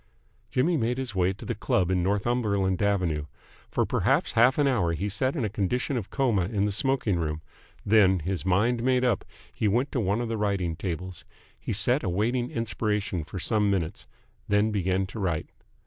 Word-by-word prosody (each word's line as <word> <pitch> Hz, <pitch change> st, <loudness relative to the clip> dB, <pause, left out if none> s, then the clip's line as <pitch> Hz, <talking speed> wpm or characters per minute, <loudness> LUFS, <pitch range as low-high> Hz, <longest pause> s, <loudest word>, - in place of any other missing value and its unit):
Jimmy 160 Hz, +6 st, +2 dB
made 120 Hz, 0 st, 0 dB
his 130 Hz, -4 st, -4 dB
way 95 Hz, 0 st, +2 dB
to 100 Hz, -, -11 dB
his 120 Hz, -, -3 dB
club 95 Hz, -3 st, +1 dB
in 90 Hz, -1 st, +2 dB
Northumberland 100 Hz, -1 st, 0 dB
Avenue. 90 Hz, -8 st, 0 dB, 0.4 s
For -, -, +1 dB
perhaps -, -, +1 dB
half 125 Hz, +4 st, +4 dB
an 145 Hz, -1 st, +3 dB
hour 100 Hz, -11 st, +1 dB
he 95 Hz, +6 st, -2 dB
sat 130 Hz, -, 0 dB
in 130 Hz, -8 st, -1 dB
a -, -, +1 dB
condition 105 Hz, +7 st, -1 dB
of 110 Hz, -6 st, -3 dB
coma 115 Hz, -10 st, +1 dB
in 100 Hz, +1 st, 0 dB
the 105 Hz, -, 0 dB
smoking 110 Hz, -4 st, +1 dB
room; 75 Hz, -1 st, -3 dB, 0.4 s
then, 100 Hz, -3 st, +5 dB
his 90 Hz, +2 st, -3 dB
mind 105 Hz, +6 st, +2 dB
made 125 Hz, 0 st, +2 dB
up, 115 Hz, -6 st, +1 dB, 0.3 s
he 110 Hz, -, 0 dB
went 120 Hz, +7 st, +1 dB
to 130 Hz, -, -1 dB
one 105 Hz, 0 st, 0 dB
of 120 Hz, -, -2 dB
the 115 Hz, 0 st, -2 dB
writing 100 Hz, -5 st, -1 dB
tables. 90 Hz, 0 st, -5 dB, 0.4 s
He -, -, -5 dB
sat 125 Hz, +7 st, +2 dB
awaiting 115 Hz, +6 st, 0 dB
inspiration 105 Hz, -5 st, -2 dB
for 80 Hz, -, -8 dB
some 105 Hz, +2 st, +1 dB
minutes, 90 Hz, -5 st, -2 dB, 0.4 s
then 105 Hz, +2 st, +3 dB
began 95 Hz, -1 st, 0 dB
to 95 Hz, +4 st, -8 dB
write. 85 Hz, -5 st, -2 dB
105 Hz, 190 wpm, -27 LUFS, 95-120 Hz, 0.4 s, then